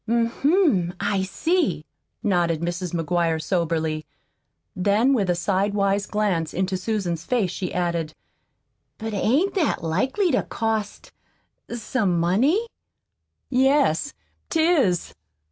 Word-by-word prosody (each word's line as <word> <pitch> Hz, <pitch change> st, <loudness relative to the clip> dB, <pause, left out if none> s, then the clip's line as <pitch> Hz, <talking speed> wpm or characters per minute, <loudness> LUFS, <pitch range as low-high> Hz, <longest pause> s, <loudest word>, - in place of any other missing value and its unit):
"Hm 230 Hz, 0 st, +1 dB
m, 280 Hz, -, +3 dB
I 200 Hz, -1 st, 0 dB
see," 330 Hz, -, 0 dB, 0.4 s
nodded 175 Hz, -6 st, +1 dB
Mrs. 175 Hz, +1 st, -3 dB
McGuire 170 Hz, -1 st, 0 dB
soberly. 160 Hz, -2 st, -1 dB, 0.7 s
Then, 205 Hz, +8 st, +3 dB
with 200 Hz, -8 st, +1 dB
a 175 Hz, -, +3 dB
sidewise 200 Hz, +2 st, 0 dB
glance 190 Hz, -7 st, -1 dB
into 190 Hz, +1 st, 0 dB
Susan's 185 Hz, -4 st, -2 dB
face, 235 Hz, -9 st, 0 dB
she 185 Hz, -, -4 dB
added: 170 Hz, -3 st, -2 dB, 0.8 s
"But 220 Hz, -1 st, -5 dB
ain't 275 Hz, -, +1 dB
that 345 Hz, -, 0 dB
likely 260 Hz, -, +1 dB
to 260 Hz, -, +2 dB
cost 220 Hz, -2 st, -3 dB, 0.6 s
some 215 Hz, -6 st, 0 dB
money?" 255 Hz, -, +2 dB, 0.9 s
"Yes, 270 Hz, -, +2 dB, 0.3 s
't 325 Hz, -, 0 dB
is." 275 Hz, -, +2 dB
200 Hz, 110 wpm, -23 LUFS, 175-250 Hz, 0.9 s, m